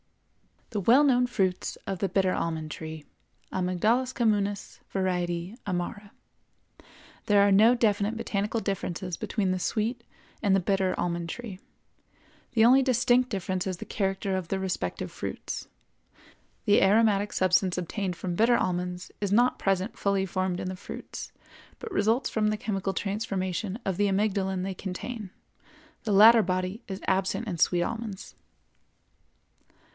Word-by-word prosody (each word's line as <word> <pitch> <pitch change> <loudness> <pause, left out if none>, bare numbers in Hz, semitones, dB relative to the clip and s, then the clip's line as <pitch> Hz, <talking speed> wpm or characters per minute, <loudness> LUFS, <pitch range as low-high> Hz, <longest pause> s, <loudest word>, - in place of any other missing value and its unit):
The 215 - -1
well 240 +9 +5
known 250 -3 +4
fruits 190 -6 -1
of 195 -2 -3
the 195 - 0
bitter 190 0 +2
almond 160 -2 -2
tree 160 -1 -7 0.5
(Amygdalus 215 +8 +1
communis, 205 -4 0
var. 190 -1 -1 0.6
amara). 200 +3 -3 1.2
There 205 -1 +5
are - - +3
no 220 +5 +6
definite 215 -1 +1
botanical 210 0 -2
differences 185 -3 -3
between 195 0 -1
the 185 - -1
sweet 235 +5 -1 0.4
and 200 -3 +3
the - - +4
bitter 190 0 +1
almond 170 -1 -2
tree. 210 -2 -7 0.9
The 225 -2 +5
only 260 +3 +7
distinct 250 -1 +3
difference 190 -3 -2
is 185 -2 -2
the - - -7
character 195 -1 -1
of 185 -3 -3
the 190 +3 -2
respective 190 -1 -3
fruits. - - -5 1.0
The 205 -2 +5
aromatic 205 0 +3
substance 185 0 +2
obtained 180 +1 -3
from 180 -1 -4
bitter 235 +4 +4
almonds 180 -1 -2
is 200 -2 -2
not 245 +4 +3
present 195 +2 -1
fully 200 -1 +1
formed 185 -1 -2
in 185 - -3
the 185 - -6
fruits, - - -8 0.5
but 455 - -8
results 225 +5 +1
from 215 -1 +1
the 215 0 0
chemical 195 -2 -2
transformation 195 -1 -2
of 190 -2 -1
the 205 - +3
amygdalin 190 -2 0
they 190 0 -3
contain; 195 +3 -6 0.8
the 210 - +1
latter 225 +3 +8
body 185 +3 -2
is 190 -1 -6
absent 190 +4 0
in 180 -5 -3
sweet 175 +2 +3
almonds. 220 -2 -5
195 Hz, 145 wpm, -27 LUFS, 185-220 Hz, 1.2 s, latter